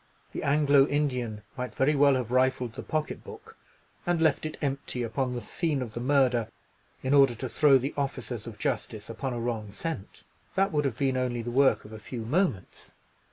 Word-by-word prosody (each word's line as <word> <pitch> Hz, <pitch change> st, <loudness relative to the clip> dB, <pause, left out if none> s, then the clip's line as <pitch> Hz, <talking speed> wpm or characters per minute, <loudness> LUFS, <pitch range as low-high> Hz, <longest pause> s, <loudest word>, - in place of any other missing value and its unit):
The -, -, -4 dB
Anglo 140 Hz, -1 st, +4 dB
Indian 125 Hz, -8 st, -1 dB
might 125 Hz, -4 st, -5 dB
very 150 Hz, +3 st, +3 dB
well 140 Hz, -1 st, +5 dB
have 125 Hz, -2 st, -2 dB
rifled 130 Hz, -2 st, +2 dB
the -, -, -6 dB
pocket 155 Hz, -1 st, -3 dB
book, -, -, -12 dB, 0.5 s
and 175 Hz, -1 st, +1 dB
left 155 Hz, -1 st, +2 dB
it 155 Hz, -, -8 dB
empty 135 Hz, -3 st, -2 dB
upon 125 Hz, +3 st, -1 dB
the 120 Hz, -, -3 dB
scene 150 Hz, -, -1 dB
of 120 Hz, -4 st, -5 dB
the 120 Hz, -, -4 dB
murder, 125 Hz, -3 st, +2 dB, 0.6 s
in 130 Hz, +1 st, +1 dB
order 135 Hz, -4 st, +6 dB
to 130 Hz, +3 st, -4 dB
throw 140 Hz, +2 st, +5 dB
the 135 Hz, +3 st, -3 dB
officers 130 Hz, -5 st, -3 dB
of 110 Hz, -2 st, -8 dB
justice 110 Hz, 0 st, -3 dB
upon 130 Hz, +3 st, -3 dB
a 120 Hz, -, -3 dB
wrong 115 Hz, -3 st, -3 dB
scent. 160 Hz, -6 st, -6 dB, 0.3 s
That 195 Hz, +1 st, +2 dB
would 150 Hz, -2 st, +1 dB
have 125 Hz, -4 st, -1 dB
been 135 Hz, -1 st, +1 dB
only 120 Hz, -2 st, -1 dB
the 120 Hz, -, -4 dB
work 135 Hz, +2 st, +3 dB
of 105 Hz, -, -11 dB
a 110 Hz, -, -8 dB
few 115 Hz, +1 st, -6 dB
moments. 140 Hz, -, -1 dB
130 Hz, 200 wpm, -28 LUFS, 120-145 Hz, 0.6 s, order